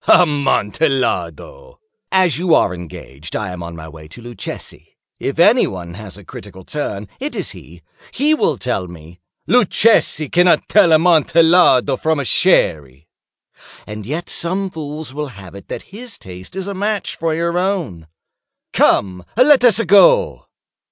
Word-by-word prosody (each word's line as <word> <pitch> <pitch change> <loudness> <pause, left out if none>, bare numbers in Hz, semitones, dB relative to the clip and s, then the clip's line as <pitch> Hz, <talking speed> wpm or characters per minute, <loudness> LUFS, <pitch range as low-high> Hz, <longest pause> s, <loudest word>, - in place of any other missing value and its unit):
"Amontillado!" 155 - 0 0.3
"As 185 -6 +2
you 175 -2 +3
are - - +2
engaged, 85 -3 -10
I 105 -4 -3
am 90 -1 -8
on 85 0 -8
my 80 -1 -10
way 80 -1 -13
to 80 - -13
Luchesi. 120 -1 -9 0.2
If 135 - -4
any 210 +9 +4
one 85 -2 -8
has 100 0 -10
a 100 - -15
critical 95 -2 -11
turn, 105 -6 -5
it 285 +3 -5
is - - -4
he. - - -15 0.3
He 295 +3 +1
will 310 - 0
tell 110 -7 -3
me—" 85 0 -14 0.3
"Luchesi 220 -8 +2
cannot 175 0 +3
tell 200 -5 +4
Amontillado 160 -4 +4
from 155 -2 -1
Sherry." 80 - 0 0.8
"And 105 0 -8
yet 160 +6 -4
some 185 +3 -2
fools 150 -3 -7
will 150 +1 -4
have 95 -3 -12
it 100 - -12
that - - -7
his 235 +1 -8
taste 90 - -12
is 190 -1 -4
a 200 - -5
match 205 +1 -3
for 165 -1 -2
your 170 +1 -1
own." 175 - -3 0.7
"Come, 90 -2 +1
let 260 +1 +5
us 230 -5 +5
go." 485 - +4
155 Hz, 150 wpm, -17 LUFS, -, 0.8 s, let